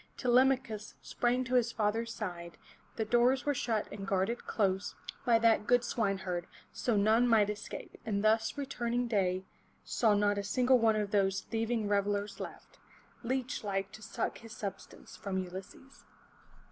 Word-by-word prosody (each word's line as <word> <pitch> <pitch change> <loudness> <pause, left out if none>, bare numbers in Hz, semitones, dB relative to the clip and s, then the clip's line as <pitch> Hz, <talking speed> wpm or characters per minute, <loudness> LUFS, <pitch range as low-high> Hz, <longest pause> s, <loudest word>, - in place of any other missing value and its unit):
Telemachus 250 -3 +2
sprang 245 +1 0
to 255 0 -5
his 245 -2 +3
father's 225 +1 0
side, 175 -6 -6 0.4
the 220 - -1
doors 245 +4 +3
were 290 - +2
shut 230 -5 -1
and 195 -1 -6
guarded 195 +5 -1
close 195 -2 0 0.3
by 235 -1 +6
that 225 -2 +3
good 245 0 +4
swineherd, 190 -7 -1 0.3
so 235 -4 0
none 220 +4 +4
might 215 -3 +4
escape, 210 - -8
and 205 -2 -1
thus, 220 +3 +2
returning 245 -3 -1
day 190 -4 0 0.4
saw 220 -3 +2
not 205 0 +2
a - - -3
single 250 +5 +3
one 225 -1 +4
of 215 - +1
all 205 - +5
those 195 0 0
thieving 225 -1 -1
revelers 205 0 0
left, - - -9 0.4
leech 255 0 -2
like 195 -1 -2
to 220 - -11
suck 215 - -3
his 225 -1 -11
substance 200 -2 -7
from 195 -2 -4
Ulysses. 190 +8 -8
220 Hz, 160 wpm, -32 LUFS, 200-240 Hz, 0.4 s, by